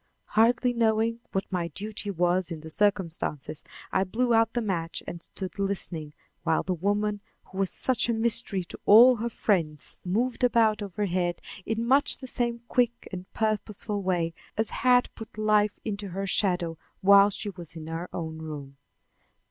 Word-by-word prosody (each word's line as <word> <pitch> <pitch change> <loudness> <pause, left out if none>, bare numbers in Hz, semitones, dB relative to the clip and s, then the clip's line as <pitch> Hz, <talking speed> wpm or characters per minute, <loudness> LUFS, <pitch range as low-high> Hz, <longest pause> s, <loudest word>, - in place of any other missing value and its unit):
Hardly 245 +3 +3
knowing 230 0 +1
what 195 - -1
my 175 -2 -1
duty 205 +5 -5
was 180 0 +1
in 165 -3 -6
the 160 0 -9
circumstances, 165 -7 -1 0.3
I - - +2
blew 235 +6 0
out 225 0 +3
the 240 - 0
match 175 -6 -3
and 170 - -7
stood 185 0 -7
listening 175 -6 -2 0.3
while 165 -1 +1
the 185 - -1
woman 205 +3 -1 0.2
who 190 - -9
was 195 -2 +1
such 255 -2 +1
a - - +3
mystery 225 -4 +1
to 170 - -11
all 240 +4 +8
her 235 +2 -2
friends 165 -10 -1
moved 235 +8 -1
about 225 -3 +3
overhead 185 -3 -1 0.3
in 225 +1 -1
much 275 +4 +4
the 265 - -9
same 240 -2 -2
quick 240 -1 0
and 185 0 -7
purposeful 215 -1 -2
way 175 -3 0 0.2
as 220 0 0
had 250 0 +3
put 220 -1 -11
life 210 -1 +2
into 205 -2 -4
her 195 +2 -4
shadow 180 -4 0 0.2
while 200 +1 +7
she 205 0 -3
was 175 -4 -10
in 160 -1 -7
her 165 +2 -5
own 160 -2 -5
room. 145 -3 -8
200 Hz, 165 wpm, -27 LUFS, 175-225 Hz, 0.3 s, all